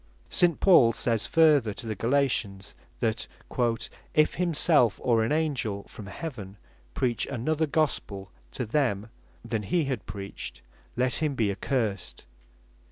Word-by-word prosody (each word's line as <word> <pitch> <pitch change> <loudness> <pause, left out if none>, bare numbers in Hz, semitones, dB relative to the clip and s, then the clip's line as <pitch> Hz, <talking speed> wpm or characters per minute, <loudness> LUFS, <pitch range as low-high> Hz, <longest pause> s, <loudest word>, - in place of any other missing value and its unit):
St. 175 -3 +3
Paul 135 -12 +6
says 115 -1 0
further 150 -10 +4
to - - -7
the 110 - -2
Galatians, 115 -6 0 0.3
that 115 -2 0 0.9
"if 155 0 +4
himself, 160 - +2
or 115 -3 +3
an 110 - -1
Angell 135 -10 -1
from 105 - -11
heaven 105 - -7 0.4
preach 120 -3 0
another 155 +5 -1
Gospel 105 - -1 0.2
to 125 - -3
them, 110 -4 0 0.3
than 115 -2 -2
he 150 - 0
had 130 -9 -4
preached, 100 0 -7 0.3
let 125 -1 0
him 150 -3 0
be 110 -5 +1
accursed." 105 -2 -2
120 Hz, 130 wpm, -27 LUFS, 105-150 Hz, 0.9 s, Paul